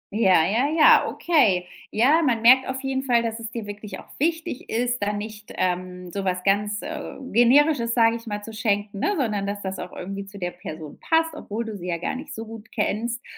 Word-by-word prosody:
Ja 190 -7 +4
ja 230 +9 +1
ja, 315 0 +6
okay. 210 - +2 0.2
Ja, 280 +10 +4
man 235 -7 +1
merkt 255 +3 +7
auf 265 +1 -4
jeden 265 0 -1
Fall, 240 -3 +2
dass 225 0 -3
es 225 -1 -6
dir 230 -2 -6
wirklich 205 0 -7
auch - - -12
wichtig 325 -1 -2
ist, 245 +1 -1
da 205 0 +1
nicht 210 +1 -7
ähm, 180 0 -2
so 195 +1 -3
was 180 -1 -1
ganz, 205 +2 +1
äh, 310 0 -6 0.2
Generisches, 240 +1 +4
sage 230 -1 +4
ich 230 0 -14
mal, 205 -1 -4
zu 225 - -8
schenken, 205 -2 -1
ne? 410 - +1
Sondern 210 -7 -1
dass 205 0 -4
das 190 0 -4
irgendwie 195 +2 -6
zu 200 +1 -11
der 175 -2 -3
Person 155 -4 -9
passt, 325 0 +1
obwohl 230 -6 -5
du 220 -1 -6
sie 180 -2 -7
ja 170 -1 -1
gar 170 - -3
nicht 285 +3 -8
so 225 - -6
gut 225 -1 -11
kennst. 230 +2 -2
220 Hz, 215 wpm, -24 LUFS, 200-255 Hz, 0.2 s, merkt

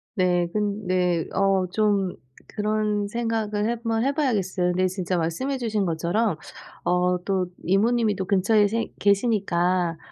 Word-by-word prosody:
네 180 -3 +2
근 210 0 -2
네. 180 -2 +1
어 195 -1 +2
좀 200 -2 +1 0.3
그런 210 -1 -1
생각을 220 -1 -1
한번 230 -1 -1
해 275 - +2
봐야겠어요. 200 - 0
근데 185 +1 +2
진짜 185 -1 -2
말씀해 170 +12 -1
주신 220 -5 -1
것처럼 170 +4 0 0.5
어 180 0 +2
또 190 -2 0 0.2
이모님이 215 +3 +2
또 190 - -3
근처에 205 +3 +3
생 230 +3 -2
계시니까 185 -5 +1
200 Hz, 265 characters per minute, -24 LUFS, 180-220 Hz, 0.5 s, 근처에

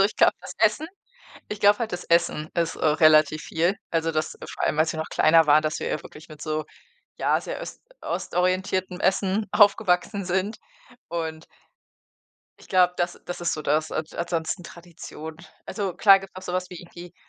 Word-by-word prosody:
Also, - - +6
ich 205 - -1
glaube, - - +5
das - - -8
Essen 220 +8 +2 0.6
ich 210 0 -5
glaube 205 0 +5
halt, 230 -4 -3
das 180 - -4
Essen 165 -2 +1
ist, 170 -2 0
äh, - - -3
relativ 155 0 +4
viel, 170 +4 0
also, 165 0 0
das 155 -1 -2
vor - - -5
allem, 150 - 0
als 160 +1 +3
wir 160 - -6
noch 160 - -3
kleiner 165 0 +4
waren, 150 +1 +6
dass 155 +2 -2
wir - - -3
ja 155 - -2
wirklich 155 +2 -13
mit 155 -1 -13
so, 155 -1 -2 0.5
ja, - - +1
sehr - - -6
öst - - -9 0.2
ostorientiertem 185 0 -1
Essen 195 +2 +1
aufgewachsen 200 -2 +3
sind. 190 +4 -1 0.5
Und 160 -1 -4 1.1
ich - - -17
glaube, 180 -2 +4
das 175 0 -2
das 175 - -6
ist 175 - 0
so 155 - -4
das. 155 +2 0
An 155 - -1
ansonsten 170 +1 -3
Tradition. 165 -2 -10 0.3
Also, 195 -5 -3
klar 195 +1 +7
gibt 195 0 -12
es 185 - -8
auch - - -10
so 180 - -4
was 185 0 -2
wie 180 - -8
irgendwie, 175 0 -12
175 Hz, 195 wpm, -25 LUFS, 160-190 Hz, 1.1 s, klar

